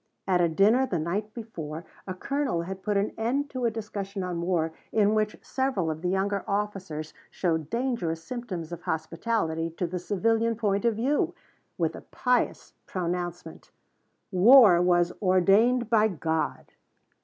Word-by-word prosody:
At 180 -2 +3
a 170 - +3
dinner 215 +10 +4
the 180 - -1
night 195 +7 -2
before 165 -9 -7 0.2
a 185 - -4
colonel 275 -6 -1
had 190 +2 -6
put 205 0 0
an 200 +1 0
end 275 +6 -1
to 255 -2 -2
a - - +4
discussion 205 -3 -5
on 175 -2 -3
war, 170 -2 0 0.2
in 210 -1 +3
which 215 -1 0
several 260 -12 -1
of 155 0 -6
the 180 - -1
younger 195 +1 0
officers 195 -7 -3 0.2
showed 160 -4 -1
dangerous 230 -10 -2
symptoms 190 -8 -5
of 170 0 -6
hospitality 165 +1 -1
to 180 - 0
the 180 +1 -3
civilian 225 +5 +1
point 205 -1 0
of 230 -2 +3
view, 265 +7 0 0.4
with - - 0
the - - -9
pious 250 -1 -1
pronouncement: 175 -1 -4 0.6
"War 200 -1 +7
was 175 0 +3
ordained 205 +6 +4
by 220 -1 +4
God." 160 -4 -2
195 Hz, 155 wpm, -27 LUFS, 170-225 Hz, 0.6 s, War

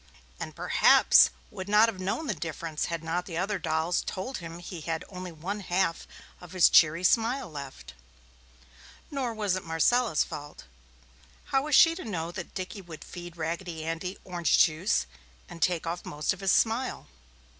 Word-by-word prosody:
And - - -6
perhaps - - +6 0.2
would 185 - -7
not 210 +2 +6
have 215 -5 -4
known 195 +12 -2
the - - -1
difference 160 -1 -4
had 170 -1 -4
not 170 +2 -2
the 165 -3 -5
other 195 +2 -1
dolls 160 +1 0
told 250 +9 -5
him 165 -1 -8
he 175 -1 -8
had 160 +1 -3
only 185 -2 -7
one 180 +6 -5
half 180 -3 -1 0.3
of 180 0 -12
his 185 -2 +6
cheery 165 +2 +5
smile 235 +7 +2
left. 140 -3 -9 1.2
Nor 260 -5 -2
was 205 -4 0
it 185 - -4
Marcella's 165 +4 +2
fault. 145 0 -9 0.8
How 270 - +1
was 300 -2 +2
she 330 -1 +7
to 355 - -7
know 170 -6 -4
that 175 0 -8
Dickie 185 +2 -5
would 170 -4 -10
feed 175 -1 -10
Raggedy 165 0 -4
Andy 165 +4 -4
orange 175 -3 +1
juice 165 +6 +3 0.4
and 170 -2 -11
take 175 -1 +1
off 170 +2 -4
most 150 +3 -2
of 190 - -11
his 195 -2 +1
smile? 235 +3 +1
180 Hz, 170 wpm, -28 LUFS, 165-200 Hz, 1.2 s, she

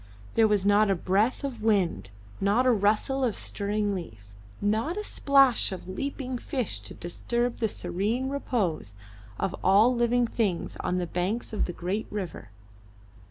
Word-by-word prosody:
There 225 -1 +5
was 205 -2 +1
not 205 +1 +4
a 195 - +3
breath 200 - +1
of 255 -5 -4
wind, 185 - +1 0.3
not 205 +6 +3
a 255 - +5
rustle 220 +5 +2
of 235 -5 +1
stirring 205 0 -2
leaf, 110 - -8 0.3
not 220 - 0
a 420 - -2
splash 275 - +3
of 185 -1 -7
leaping 255 +5 -4
fish 235 - -3
to 105 0 -9
disturb 235 +7 -2
the 225 - +1
serene 200 +9 -1
repose 205 - -2 0.4
of 185 - -1
all 205 +6 +5
living 240 0 +2
things 215 -7 -1
on 180 - -1
the 180 - 0
banks 185 +8 -2
of 215 - 0
the 175 - -5
great 185 +6 -3
river. 185 - -5
210 Hz, 160 wpm, -27 LUFS, 185-240 Hz, 0.4 s, There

